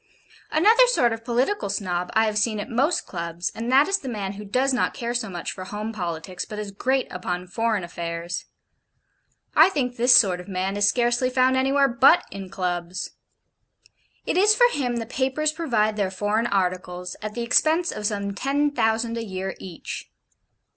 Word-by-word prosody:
Another 445 +10 +5
sort 245 - +2
of 225 0 -7
Political 250 - 0
Snob 180 -3 -2
I 220 0 +4
have 215 -1 -1
seen 215 -1 0
at 205 - -6
most 275 +9 +1
Clubs 170 -1 -4
and 230 +2 -4
that 275 +3 +5
is 390 0 +1
the 265 - -6
man 200 -4 -4
who 205 +1 -8
does 260 +6 +1
not 245 - 0
care 235 0 -3
so 240 -3 -2
much 175 -2 -5
for 185 - -7
home 210 +3 -5
politics, 175 -2 -4
but 215 - -8
is 210 -1 -5
great 260 +6 0
upon 180 0 -4
foreign 215 +2 -1
affairs. 170 0 -5 1.1
I - - +7
think 255 -8 -2
this 245 +2 +6
sort 185 -4 +5
of 180 - -10
man 190 0 -2
is 205 0 +3
scarcely 240 +2 +1
found 255 0 +3
anywhere 275 +1 +3
BUT 265 +7 +5
in 195 -1 -7
Clubs. 180 0 -3 1.1
It - - -1
is 420 +3 +5
for 485 +1 +6
him 250 -4 -1
the 230 -1 -3
papers 265 +5 0
provide 230 -10 0
their 200 -2 0
foreign 210 +4 0
articles, 180 -2 -2
at 215 0 -6
the 240 - -2
expense 315 +8 +2
of 210 -1 -2
some 200 -1 -3
ten 280 +7 0
thousand 230 -2 0
a - - -4
year 190 -2 -4
each. 180 -4 -8
220 Hz, 185 wpm, -24 LUFS, 190-260 Hz, 1.1 s, I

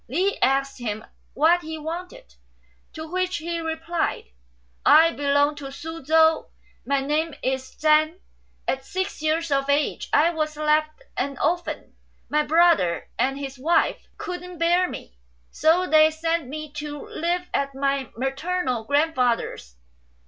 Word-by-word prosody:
Li 370 - +1
asked 275 0 +1
him 220 -2 -4 0.3
what 335 +5 +4
he 320 -1 -6
wanted, 360 +11 -7 0.6
to 315 0 -7
which 370 +2 -1
he 335 +2 -3
replied, 325 +1 -2 0.4
" - - -38 0.2
I 325 +2 +7
belong 285 0 +2
to 275 -2 -7
Su 325 +3 -8
chou; 320 +2 +4 0.4
my 280 -1 +2
name 300 +3 -1
is 260 0 -2
Chan; 310 +2 +3 0.5
at 265 0 -1
six 375 +3 -4
years 315 +1 0
of 275 0 +1
age 285 +1 0
I 315 +4 +4
was 310 -2 -2
left 310 +7 +1
an 275 -1 -2
orphan; 345 +4 -2 0.3
my 300 - +2
brother 315 - +3
and 265 +3 +1
his 275 -1 -6
wife 330 +6 +1
couldn't 360 -1 -6
bear 350 +2 +3
me, 65 - -10 0.3
so 335 +4 +3
they 310 -2 +6
sent 325 -1 -1
me 305 +2 -6
to 295 -1 -6
live 350 +2 -2
at 275 -1 -1
my 275 -1 -1
maternal 270 -2 -2
grandfather's. 255 - 0
310 Hz, 140 wpm, -24 LUFS, 275-335 Hz, 0.6 s, I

